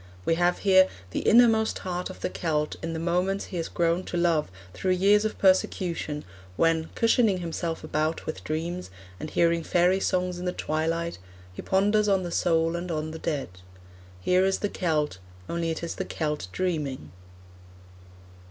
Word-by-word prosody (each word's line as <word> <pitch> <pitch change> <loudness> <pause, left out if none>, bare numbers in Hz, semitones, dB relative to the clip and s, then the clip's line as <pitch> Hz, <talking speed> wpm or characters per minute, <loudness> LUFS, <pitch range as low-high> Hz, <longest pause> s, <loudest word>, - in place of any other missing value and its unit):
We - - +3
have 175 +1 +2
here 190 -1 +6 0.2
the - - -1
innermost 225 -1 +4
heart 180 0 -3
of 185 - -10
the - - -1
Celt 150 -3 -1
in 165 0 -3
the - - -3
moments 180 +4 0
he 180 - -6
has 165 - -2
grown 170 +1 0
to 175 - -3
love 170 - +2 0.2
through 185 -1 0
years 200 +3 +4
of 215 - -2
persecution, 180 -5 +1 0.3
when, 165 - +2
cushioning 225 -4 +3
himself 165 -1 -4
about 155 +1 -1
with 155 - -5
dreams, 170 - -3 0.3
and 155 - -5
hearing 170 +1 +2
fairy 180 +3 +2
songs 180 -2 0
in 180 - -5
the 180 - -1
twilight, 165 - -2 0.3
he - - -7
ponders 205 +2 +2
on 195 -2 +2
the 175 - -4
soul 165 -1 +1
and 175 +1 -4
on 155 -1 -2
the 160 - -7
dead. 150 - -2 0.7
Here 180 - +3
is 190 0 +2
the 205 - -2
Celt, 150 - -1 0.3
only 170 -1 -2
it 160 +1 -3
is 170 - -3
the - - -4
Celt 150 - -3
dreaming. 150 - -2
170 Hz, 170 wpm, -26 LUFS, 160-185 Hz, 0.7 s, here